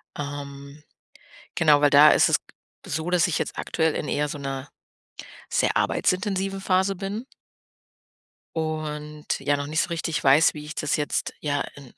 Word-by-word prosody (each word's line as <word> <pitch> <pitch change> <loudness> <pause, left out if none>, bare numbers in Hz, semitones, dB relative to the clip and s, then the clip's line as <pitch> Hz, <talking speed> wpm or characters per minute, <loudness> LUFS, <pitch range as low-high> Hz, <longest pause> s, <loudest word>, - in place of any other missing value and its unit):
Ähm, 140 0 -7 0.7
genau, 150 -2 +4
weil 145 - +4
da 145 +2 +8
ist - - +5
es - - +4 0.5
so, 160 +4 -3
dass 180 -3 +3
ich 175 - -1
jetzt - - -4
aktuell 160 -2 0
in 150 - -3
eher 150 0 0
so 145 - -6
'ner 135 0 -5 0.8
sehr - - +1
arbeitsintensiven 195 0 0
Phase 190 +1 +1
bin. 200 +6 -5 1.3
Und 150 -1 -3
ja 145 +1 +1
noch 145 0 -4
nicht 155 +2 +1
so - - -2
richtig 165 -1 -2
weiß, 140 +4 +5
wie 150 -1 -8
ich 155 0 -8
das 150 - 0
jetzt 150 -1 -2
ja, 145 -2 -1
äh, 140 -3 -13
150 Hz, 160 wpm, -25 LUFS, 145-170 Hz, 1.3 s, da